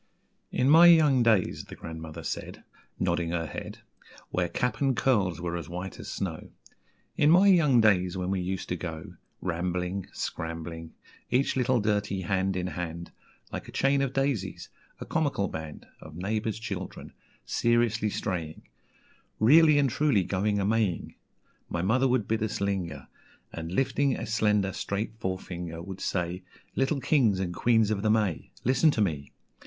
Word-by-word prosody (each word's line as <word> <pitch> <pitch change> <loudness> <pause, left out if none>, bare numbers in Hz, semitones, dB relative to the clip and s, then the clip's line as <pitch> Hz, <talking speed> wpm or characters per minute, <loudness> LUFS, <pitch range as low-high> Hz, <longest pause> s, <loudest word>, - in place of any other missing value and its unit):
"In 125 - +1
my 165 +4 +8
young 155 -6 +6
days," 110 -6 +2
the - - -10
grandmother 80 0 -8
said - - -5 0.3
(Nodding 85 -1 0
her 85 -1 -1
head, - - -8 0.5
Where 90 -1 0
cap 125 +11 -2
and 135 -3 +2
curls 100 -10 +1
were 85 0 -3
as 85 -3 -6
white 90 +2 -6
as - - -8
snow), 85 -5 -4 0.7
"In 150 - +4
my 180 +5 +6
young 160 -11 +5
days, 95 -4 +3
when 90 0 -2
we 95 -1 0
used 95 +1 -3
to 90 - 0
go 80 -2 -6 0.3
Rambling, 90 +2 -2
Scrambling; 80 0 -5 0.3
Each 130 +3 +1
little 125 -1 +2
dirty 105 -2 0
hand 95 +1 0
in 90 -1 -2
hand, 85 -2 -5 0.4
Like - - -5
a - - -9
chain 140 0 +2
of 135 -2 0
daisies, 135 -8 -2 0.3
a - - -6
comical 145 -11 0
band 80 -3 -7 0.2
Of 80 0 -11
neighbours' 105 +4 -2
children, 100 -5 -6 0.3
seriously 120 -2 +1
straying, 85 -7 -4 0.8
Really 150 +6 +6
and 140 -1 +4
truly 130 -6 +2
going 100 +3 0
a 100 - 0
Maying, 105 -4 0 0.6
My 85 - -2
mother 125 +7 +3
would 125 -5 +1
bid 110 -1 0
us 110 -1 -2
linger, 95 -4 -2 0.5
And 80 0 -6
lifting 135 +5 +1
a 115 - -4
slender, 105 -3 +1
straight 110 +5 -4
forefinger, 90 -3 -4
Would 95 +1 -8
say 90 0 -2 0.3
'Little 135 +1 0
Kings 115 -12 +3
and 90 -2 -2
Queens 110 +2 +3
of 100 -2 -1
the 110 - +1
May, 105 -5 +1
Listen 130 +6 +4
to 120 - +1
me! 75 -8 -1
100 Hz, 160 wpm, -28 LUFS, 90-120 Hz, 0.8 s, my